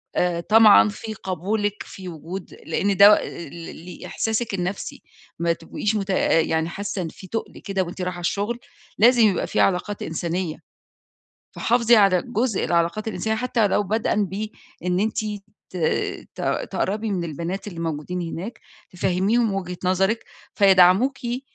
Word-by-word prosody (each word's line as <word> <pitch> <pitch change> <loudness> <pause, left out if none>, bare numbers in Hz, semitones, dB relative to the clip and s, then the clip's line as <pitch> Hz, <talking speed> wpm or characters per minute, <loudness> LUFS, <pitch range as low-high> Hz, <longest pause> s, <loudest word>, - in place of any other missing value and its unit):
آآ، 175 -1 +1
طمعًا 215 +2 +7
في 220 +2 -6
قبولِك 205 +2 -2
في 185 -2 -9
وجود 170 +3 -8
لإن 200 -1 0
ده 205 +1 +8
ل 170 - -7
ل 165 -1 -9
ل - - -16
لإحساسِك 225 0 -2
النَفْسي، 190 +1 -4 0.4
ما 170 0 +2
تبقيش 170 +6 -3
مت 200 -2 -1
آآ، 165 -3 +3
يعني 160 +1 0
حاسة 200 +1 -4
إن 170 - -3
في 190 - -12
تُقل 225 +4 -5
كده 195 -3 -2
وأنتِ 180 +2 -7
رايحة 180 -1 -3
الشغل، 205 +7 -1 0.4
لازم 240 +3 +6
يبقى 195 - 0
في - - -1
علاقات 195 +2 +1
إنسانية. 170 0 -3 1.0
فحافظي 235 0 +3
على 195 -4 +5
جزء 240 -3 -1
العلاقات 170 +6 0
الإنسانية 220 +2 -1
حتى 240 -2 +1
لو 205 - +2
بدءً 215 +3 -1
بإن 190 -2 -4
أنتِ 220 +2 -1 0.5
ت - - -8 0.6
ت - - -7 0.3
تقرّبي 210 +3 -1
من 185 -3 -1
البنات 170 +5 -4
اللي 175 -5 -7
موجودين 165 +2 -3
هناك، 180 +7 -6 0.3
تفَهّميهم 195 +5 +1
وجهة 180 -2 -4
نظرِك، 195 +5 +1 0.3
فيدعموكِ 195 +7 +5
ق 245 0 -3
195 Hz, 150 wpm, -23 LUFS, 175-215 Hz, 1.0 s, ده